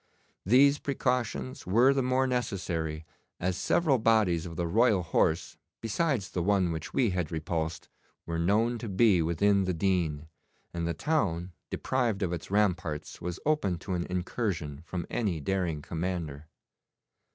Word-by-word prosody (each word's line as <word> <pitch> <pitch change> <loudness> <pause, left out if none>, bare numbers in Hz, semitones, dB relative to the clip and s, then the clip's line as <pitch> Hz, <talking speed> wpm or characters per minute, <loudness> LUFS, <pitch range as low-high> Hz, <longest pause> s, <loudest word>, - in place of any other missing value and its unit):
These 140 +6 +5
precautions 125 -3 -2
were 120 +8 +5
the 135 - +1
more 130 +1 +2
necessary 85 -11 -2 0.3
as 90 +1 0
several 140 - +2
bodies 105 -7 +2
of 85 - -8
the 85 - -1
Royal 105 +1 +3
Horse, 85 -1 0 0.2
besides 115 - -1
the 90 - -1
one 95 -1 +2
which 80 -1 -5
we 120 -6 +2
had 90 -4 -2
repulsed, 80 0 -3 0.4
were 85 0 -3
known 110 +7 +2
to 115 - -5
be 95 -2 +4
within 95 +4 +2
the 90 -1 -1
Deane, 80 -4 0 0.5
and 85 -1 -2
the 85 - -1
town, 95 - 0 0.2
deprived 120 -6 -1
of 90 -2 -1
its 85 - -6
ramparts, 90 -8 -1
was 90 +1 -4
open 145 - +1
to 95 +2 -5
an 85 -1 -2
incursion 90 - -2
from 90 -2 -4
any 100 -9 -1
daring 85 -1 -1
commander. 80 -4 -4
95 Hz, 150 wpm, -29 LUFS, 85-115 Hz, 0.5 s, These